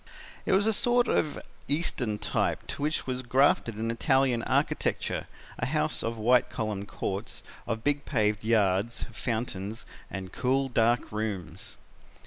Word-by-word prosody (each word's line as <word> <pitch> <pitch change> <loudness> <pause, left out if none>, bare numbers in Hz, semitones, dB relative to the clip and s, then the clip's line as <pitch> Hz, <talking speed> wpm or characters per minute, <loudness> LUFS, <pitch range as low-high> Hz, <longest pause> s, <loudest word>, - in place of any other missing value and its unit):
"It - - +3
was 195 +2 +4
a 220 - +3
sort 245 +3 +3
of 150 - +1 0.3
Eastern 140 -8 0
type 105 0 -1
to - - -4
which 155 +2 0
was 130 -1 -2
grafted 130 -2 +3
an 115 +2 -1
Italian 130 -1 +2
architecture - - 0 0.3
a - - 0
house - - +1
of 115 0 -2
white 120 +3 +4
columned 105 -2 -3
courts, 100 +2 -3 0.2
of 110 0 -2
big 145 0 +1
paved 105 -5 +1
yards, 110 0 +2
fountains 110 -2 -3 0.2
and 95 -2 -6
cool, 135 +3 +1
dark 120 0 +2
rooms. 95 -6 -4
115 Hz, 140 wpm, -28 LUFS, 105-135 Hz, 0.3 s, was